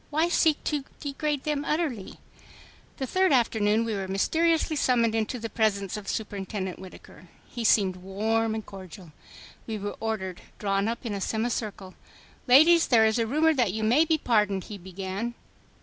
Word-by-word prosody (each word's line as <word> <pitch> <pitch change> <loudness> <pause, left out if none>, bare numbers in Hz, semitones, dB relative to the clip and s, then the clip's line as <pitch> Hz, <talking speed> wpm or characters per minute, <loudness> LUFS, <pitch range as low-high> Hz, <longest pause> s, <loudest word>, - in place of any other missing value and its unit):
Why 315 +3 +1
seek 320 -3 +2
to 295 -3 -1 0.2
degrade 290 0 -2
them 295 -1 -1
utterly? 295 - -2 0.8
The 270 - -2
third 375 +7 +2
afternoon 225 -3 +2
we 225 - -2
were 195 -2 -3
mysteriously 320 - +1
summoned 235 -5 +2
into 225 +2 -1
the 230 -1 -5
presence 200 -3 0
of 210 -2 -7
Superintendent 195 -3 -4
Whittaker. 185 -1 -13 0.2
He 240 - -6
seemed 195 -4 +3
warm 220 +4 -1
and 220 - -5
cordial. 185 -3 -11 0.6
We 220 -1 -3
were 205 0 -5
ordered 200 -5 -3 0.2
drawn 200 0 0
up 235 +2 -4
in 225 - -3
a 200 - -4
semi 220 +4 -1
circle. 205 -5 -5 0.5
"Ladies, 320 +7 +6
there 225 -3 +5
is 220 +2 +2
a 230 - +1
rumor 310 +6 +3
that 240 -10 +1
you 220 +1 -3
may 245 +8 +4
be 320 0 +1
pardoned," 210 -8 +1
he 205 -2 -9
began. 190 +5 -5
220 Hz, 170 wpm, -27 LUFS, 195-265 Hz, 0.8 s, Ladies